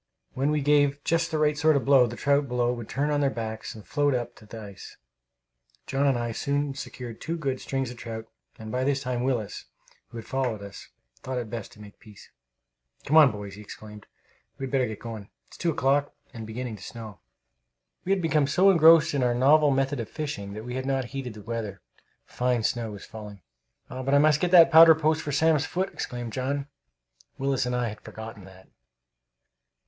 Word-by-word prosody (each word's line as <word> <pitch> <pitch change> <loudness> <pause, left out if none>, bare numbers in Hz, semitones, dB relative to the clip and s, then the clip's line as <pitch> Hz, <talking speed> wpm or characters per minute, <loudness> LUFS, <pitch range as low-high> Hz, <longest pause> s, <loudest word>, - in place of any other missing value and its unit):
When 135 +3 0
we 150 -1 +1
gave 145 0 +3
just 165 0 +1
the 155 - -1
right 150 -1 +2
sort 155 +1 +3
of 140 - 0
blow, 135 -3 +6
the 120 - -7
trout 140 +2 +1
below 125 -1 0
would 120 -3 -7
turn 145 +2 -1
on 145 0 +1
their 140 - +3
backs 110 -3 -5
and 110 - -12
float 145 -2 +1
up 120 -1 -3
to 110 - -16
the 115 - -9
ice. 100 -3 -11 0.9
John 135 +1 0
and 135 -3 +2
I 120 -1 -2
soon 140 +4 -1
secured 125 -4 -8
two 165 +1 -3
good 135 -5 -3
strings 135 -2 -3
of 125 - -11
trout; 115 -1 -7 0.3
and 110 -1 -8
by 125 +2 -1
this 140 0 0
time 125 -1 -2
Willis, 120 -6 -2 0.4
who 120 - -11
had 115 - -7
followed 125 -6 -2
us, 100 -1 -10 0.3
thought 130 0 -4
it 120 -3 -4
best 115 -4 -6
to - - -18
make 105 -1 -13
peace. 105 -2 -16 0.7
"Come 150 - +1
on, 155 -5 +8
boys!" 105 -2 -8
he 105 - -10
exclaimed. 105 0 -11 0.5
"We 135 - -4
had 130 - -7
better 130 -2 +2
be 110 - -5
going. 110 -2 -8 0.2
It's - - -15
two 175 - 0
o'clock, 140 -1 +1 0.2
and 115 -2 -7
beginning 115 0 -5
to 95 - -13
snow." 110 -4 -9 0.8
We 190 - -2
had 195 -2 +1
become 155 -3 +2
so 185 +7 +5
engrossed 165 -3 +6
in 140 - 0
our 120 -1 +2
novel 145 +4 +5
method 135 0 0
of 115 - -5
fishing 100 -10 -5
that 110 +2 -7
we 125 - -5
had 130 +1 -3
not 135 -1 0
heeded 130 -5 -5
the 105 - -11
weather. 105 -3 -5 0.5
Fine 125 -2 -1
snow 115 0 -1
was 100 -2 -9
falling. 105 -4 -10 0.4
"But 130 +2 -1
I - - +7
must 150 0 +4
get 180 - +1
the 175 -2 +9
powder 165 0 +8
post 155 0 +1
for 145 - -4
Sam's 150 0 +2
foot!" 190 +2 -2
exclaimed 120 -2 -5
John. 135 +2 -2 0.7
Willis 135 -2 0
and 125 - -1
I 120 -2 0
had 105 - -10
forgotten 110 -3 -9
that. 95 0 -16
130 Hz, 210 wpm, -26 LUFS, 110-145 Hz, 0.9 s, the